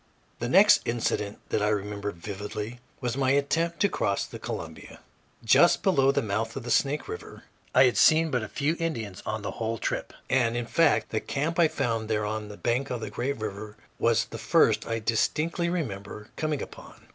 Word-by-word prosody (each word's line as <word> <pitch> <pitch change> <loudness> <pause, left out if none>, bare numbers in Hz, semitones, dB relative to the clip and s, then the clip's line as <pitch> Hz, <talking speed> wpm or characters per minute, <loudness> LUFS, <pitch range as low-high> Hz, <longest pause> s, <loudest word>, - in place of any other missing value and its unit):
The 120 - -2
next 195 +8 +7
incident 110 -3 -1
that - - 0
I 105 - +2
remember 105 0 -2
vividly 105 +5 -6 0.2
was 125 -2 -1
my 135 -1 +1
attempt 165 +4 0
to 200 - +5
cross 100 - -1
the - - -9
Columbia, - - -7 0.5
just 170 +10 +5
below 135 -8 +4
the 140 - 0
mouth 110 +2 -2
of 135 - -5
the 120 - -4
Snake 145 +4 +1
River. - - -8 0.3
I 130 - +8
had 125 -2 +3
seen 160 0 +5
but 120 -5 -1
few 150 +3 0
Indians 115 - -3
on 110 -1 -3
the - - -3
whole 115 0 -3
trip - - -3 0.2
and, 120 -3 +2
in 120 - -2
fact, 165 +6 +2
the 110 - 0
camp 160 +8 -2
I 170 - +6
found 115 -7 -2
there 105 -1 0
on 105 0 -3
the 105 0 -10
bank 125 +4 -1
of 125 -2 -3
the 105 - -5
great 130 +6 -2
river 105 0 -6 0.2
was - - +3
the - - -8
first - - +3
I 115 - -1
distinctly 150 +10 0
remember 105 - -4
coming 155 -2 -2
upon. - - -13
120 Hz, 190 wpm, -27 LUFS, 105-145 Hz, 0.5 s, I